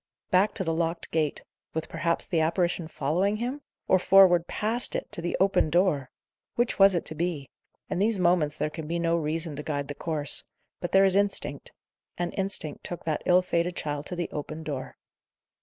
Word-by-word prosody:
Back 185 Hz, +3 st, +3 dB
to 195 Hz, -, 0 dB
the 165 Hz, -2 st, -1 dB
locked 165 Hz, +1 st, -2 dB
gate 155 Hz, -3 st, -1 dB, 0.3 s
with 160 Hz, 0 st, -2 dB
perhaps 170 Hz, 0 st, 0 dB
the 165 Hz, -, 0 dB
apparition 170 Hz, +1 st, 0 dB
following 175 Hz, +8 st, 0 dB
him? 250 Hz, +6 st, -3 dB, 0.3 s
or 185 Hz, -, +4 dB
forward 180 Hz, -2 st, +6 dB
past 230 Hz, +4 st, 0 dB
IT -, -, -4 dB
to -, -, +2 dB
the 175 Hz, -, -2 dB
open 190 Hz, -4 st, +3 dB
door? 155 Hz, -6 st, +2 dB, 0.5 s
Which 240 Hz, -2 st, 0 dB
was 195 Hz, -1 st, +7 dB
it 170 Hz, -, -1 dB
to -, -, -5 dB
be? 160 Hz, -4 st, -3 dB, 0.4 s
In 185 Hz, -1 st, -3 dB
these 215 Hz, +1 st, +2 dB
moments 170 Hz, -4 st, +2 dB
there 155 Hz, -, -1 dB
can 155 Hz, 0 st, -7 dB
be 170 Hz, +2 st, -1 dB
no 170 Hz, 0 st, +1 dB
reason 160 Hz, -1 st, -2 dB
to -, -, -4 dB
guide 145 Hz, -2 st, -3 dB
the -, -, -3 dB
course; 150 Hz, -1 st, +1 dB, 0.4 s
but 175 Hz, -, -4 dB
there 195 Hz, 0 st, +6 dB
is 190 Hz, -1 st, +3 dB
instinct; 195 Hz, -8 st, 0 dB, 0.5 s
and 175 Hz, 0 st, -2 dB
instinct 190 Hz, -7 st, -2 dB
took 175 Hz, -, -6 dB
that 155 Hz, -2 st, -1 dB
ill 180 Hz, 0 st, +5 dB
fated 175 Hz, 0 st, -1 dB
child 145 Hz, -1 st, -4 dB
to 180 Hz, -, -5 dB
the 175 Hz, -1 st, -2 dB
open 155 Hz, +2 st, -6 dB
door. 140 Hz, -4 st, -6 dB
170 Hz, 195 wpm, -27 LUFS, 155-185 Hz, 0.5 s, was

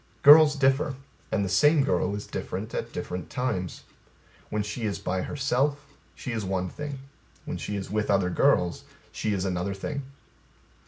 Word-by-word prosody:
Girls 150 Hz, +1 st, +9 dB
differ; 135 Hz, 0 st, +2 dB, 0.4 s
and 100 Hz, -2 st, +1 dB
the -, -, -2 dB
same 145 Hz, -, +4 dB
girl 135 Hz, -7 st, +1 dB
is 105 Hz, -, -5 dB
different -, -, -5 dB
at -, -, -3 dB
different 90 Hz, 0 st, -5 dB
times. 110 Hz, -9 st, -3 dB, 0.7 s
When 105 Hz, -1 st, -1 dB
she 105 Hz, +3 st, -5 dB
is 100 Hz, -2 st, -1 dB
by 95 Hz, -, -2 dB
herself, 140 Hz, +3 st, 0 dB, 0.3 s
she 125 Hz, -, -5 dB
is 115 Hz, -2 st, -2 dB
one 95 Hz, -1 st, -1 dB
thing. 145 Hz, +3 st, -6 dB, 0.5 s
When -, -, -4 dB
she 105 Hz, -, -4 dB
is 95 Hz, -1 st, -5 dB
with 105 Hz, 0 st, -1 dB
other 95 Hz, -3 st, +2 dB
girls 90 Hz, 0 st, +2 dB, 0.3 s
she 110 Hz, -, -2 dB
is 95 Hz, -2 st, -1 dB
another 95 Hz, +1 st, -2 dB
thing. 140 Hz, +8 st, -4 dB
105 Hz, 165 wpm, -27 LUFS, 95-140 Hz, 0.7 s, Girls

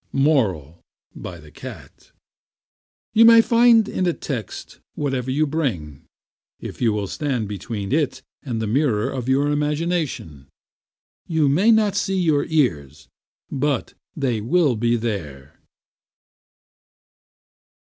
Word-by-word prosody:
MORAL, 105 Hz, -, 0 dB, 0.3 s
BY 85 Hz, -2 st, -8 dB
THE 75 Hz, -1 st, -16 dB
CAT -, -, -12 dB, 1.0 s
You 225 Hz, -, +6 dB
can 230 Hz, 0 st, +8 dB
find 230 Hz, -2 st, +5 dB
in 185 Hz, -, -1 dB
a 175 Hz, -, +1 dB
text 125 Hz, -11 st, -7 dB, 0.2 s
whatever 135 Hz, -3 st, -2 dB
you 145 Hz, +4 st, +1 dB
bring, 115 Hz, -, -3 dB, 0.5 s
if -, -, -9 dB
you 115 Hz, -2 st, +3 dB
will 105 Hz, -1 st, -2 dB
stand 125 Hz, -, -3 dB
between 100 Hz, 0 st, -5 dB
it 145 Hz, -1 st, 0 dB, 0.2 s
and 120 Hz, -6 st, -4 dB
the 110 Hz, -, -2 dB
mirror 115 Hz, -2 st, 0 dB
of 130 Hz, -1 st, -4 dB
your 140 Hz, +2 st, +2 dB
imagination. 150 Hz, -, -2 dB, 0.8 s
You 160 Hz, -3 st, +1 dB
may 175 Hz, +11 st, +3 dB
not 215 Hz, -3 st, +3 dB
see 195 Hz, -1 st, 0 dB
your 155 Hz, -5 st, +2 dB
ears, 80 Hz, -, -1 dB, 0.4 s
but 140 Hz, -1 st, -1 dB, 0.2 s
they 125 Hz, -7 st, -1 dB
will 145 Hz, +2 st, +2 dB
be 120 Hz, +2 st, +1 dB
there. 85 Hz, -, -5 dB
135 Hz, 120 wpm, -22 LUFS, 105-160 Hz, 1.0 s, can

